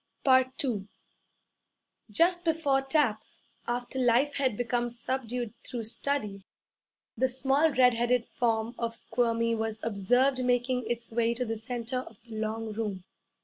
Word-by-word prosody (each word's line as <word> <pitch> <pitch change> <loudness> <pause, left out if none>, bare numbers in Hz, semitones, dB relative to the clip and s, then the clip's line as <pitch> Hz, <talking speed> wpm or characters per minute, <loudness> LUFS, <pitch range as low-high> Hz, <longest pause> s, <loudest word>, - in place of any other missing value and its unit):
II 260 -5 +2 1.2
Just 350 - +2
before 315 -5 +2
taps, 270 -6 0 0.2
after 245 +2 -2
life 250 +4 +3
had 260 -6 +1
become 240 0 0
subdued 240 -1 -3
through 240 -2 -4
study, 215 -4 -1 0.7
the 260 +3 +2
small 270 +5 +2
red 250 -2 +5
headed 240 +1 +1
form 230 -1 -1
of 230 -1 -1
Squirmy 230 0 0
was 220 -1 -2
observed 245 +5 +2
making 250 0 +1
its 235 -1 -3
way 235 0 +1
to 250 +1 -2
the 225 -1 -2
centre 240 +2 -4
of 230 -4 -10
the 230 -2 -10
long 220 0 -3
room. 205 -4 -3
240 Hz, 135 wpm, -29 LUFS, 225-260 Hz, 1.2 s, red